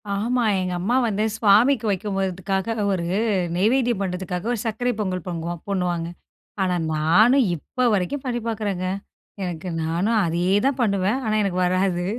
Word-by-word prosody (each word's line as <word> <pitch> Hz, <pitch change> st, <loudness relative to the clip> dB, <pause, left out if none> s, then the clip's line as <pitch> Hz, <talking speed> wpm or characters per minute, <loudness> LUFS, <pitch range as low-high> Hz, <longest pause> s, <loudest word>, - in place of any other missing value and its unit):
ஆமா. 240 Hz, +5 st, 0 dB, 0.2 s
எங்க 185 Hz, -1 st, -2 dB
அம்மா 210 Hz, +8 st, 0 dB
வந்து 210 Hz, -1 st, 0 dB
சுவாமிக்கு 225 Hz, +4 st, +4 dB
வைக்கும் 195 Hz, +1 st, -2 dB
போதுக்காக, 190 Hz, +3 st, -1 dB, 0.2 s
1 180 Hz, -3 st, -1 dB, 0.5 s
நெய்வேத்தியம் 235 Hz, +2 st, +2 dB
பண்ணுறதுக்காக, 180 Hz, 0 st, -3 dB
1 235 Hz, -, -3 dB
சர்க்கரை 230 Hz, +3 st, 0 dB
பொங்கல் 185 Hz, -4 st, -2 dB
பொங்குவோம் 170 Hz, -1 st, -4 dB
பண்ணுவாங்க. 175 Hz, -3 st, -1 dB, 0.6 s
ஆனா 180 Hz, -1 st, +1 dB, 0.2 s
நானும், 215 Hz, -, +4 dB
இப்ப 250 Hz, -, -1 dB
வரைக்கும் 210 Hz, +9 st, -2 dB
பண்ணி 240 Hz, -2 st, -2 dB
பாக்குறேங்க. 205 Hz, -5 st, -2 dB, 0.6 s
எனக்கு 180 Hz, -1 st, -4 dB
நானும் 175 Hz, +8 st, +1 dB
அதே 170 Hz, +2 st, -1 dB, 0.2 s
தான் 275 Hz, -1 st, +1 dB
பண்ணுவேன். 200 Hz, +2 st, +1 dB
ஆனா 215 Hz, -1 st, 0 dB
எனக்கு 185 Hz, -2 st, -1 dB
வராது 185 Hz, -1 st, +1 dB
195 Hz, 145 wpm, -23 LUFS, 180-225 Hz, 0.6 s, சுவாமிக்கு